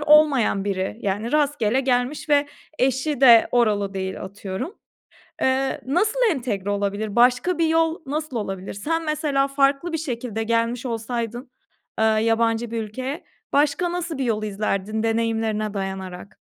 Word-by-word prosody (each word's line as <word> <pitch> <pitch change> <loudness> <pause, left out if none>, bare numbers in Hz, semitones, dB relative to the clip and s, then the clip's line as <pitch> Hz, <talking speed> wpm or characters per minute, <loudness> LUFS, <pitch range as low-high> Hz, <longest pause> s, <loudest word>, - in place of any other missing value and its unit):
olmayan 290 -9 +4
biri. 195 0 -2
Yani, 205 +4 -2
rastgele 280 -5 +2
gelmiş 255 +3 -1
ve 290 -1 +4 0.3
eşi 265 +2 0
de 235 -4 +7
oralı 210 -5 +2
değil, 190 0 -4
atıyorum. 195 - -6 0.7
Eee, 265 0 +1
nasıl 410 - +1
entegre 220 - -2
olabilir? 205 +1 -2
Başka 250 +9 +3
bir 330 -1 +2
yol 325 0 +2
nasıl 295 0 -4
olabilir? 195 -3 -4
Sen 325 +11 -2
mesela 295 -3 0
farklı 275 +4 +1
bir - - +1
şekilde 240 -7 -3
gelmiş 230 +2 0
olsaydın, 235 +1 -4 0.5
eee, 220 - +4
yabancı 225 +1 +2
bir 230 -1 -2
ülkeye, 260 - -5 0.3
başka 295 +5 +2
nasıl 345 -3 -3
bir 270 - -1
yol 220 -3 0
izlerdin 210 +1 -2
deneyimlerine 225 -2 0
dayanarak? 190 -1 -6
240 Hz, 140 wpm, -23 LUFS, 215-285 Hz, 0.7 s, de